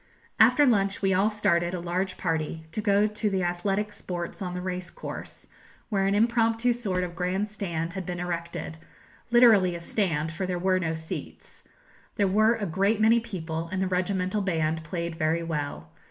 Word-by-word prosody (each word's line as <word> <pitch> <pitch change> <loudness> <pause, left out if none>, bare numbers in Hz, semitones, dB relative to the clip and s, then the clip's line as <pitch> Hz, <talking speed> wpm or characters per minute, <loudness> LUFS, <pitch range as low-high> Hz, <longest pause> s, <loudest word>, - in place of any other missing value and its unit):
After 295 - +6
lunch 200 -5 +2
we 195 -1 +3
all 195 +3 +3
started 185 -5 +1
a - - -3
large 180 +2 -2
party 160 -1 -2
to 215 - -3
go 205 0 +3
to 210 0 -1
the 190 -2 0
athletic 195 +4 -1
sports 175 -2 -6
on 180 -2 -3
the - - -3
racecourse, 180 -1 -6 0.4
where 195 -3 +1
an 200 - +2
impromptu 230 +2 +2
sort 195 -7 -2
of 175 -1 -5
grand 185 +4 -1
stand 170 -5 -4
had 190 -1 -4
been 175 0 -5
erected 170 -2 -4 0.5
literally 225 -7 +6
a - - -5
stand, 165 -4 -1
for 180 +4 -3
there 180 -1 -1
were 185 +1 +2
no 160 -2 -1
seats. 160 0 -8 0.5
There 205 -3 +2
were 215 +4 +4
a 220 -3 -3
great 195 +5 +1
many 225 +2 +5
people, 165 -7 -5
and 190 - -2
the 190 - +1
regimental 185 +2 0
band 160 -4 0
played 170 -1 -4
very 160 +2 +1
well. 145 - -4
185 Hz, 180 wpm, -27 LUFS, 170-205 Hz, 0.5 s, After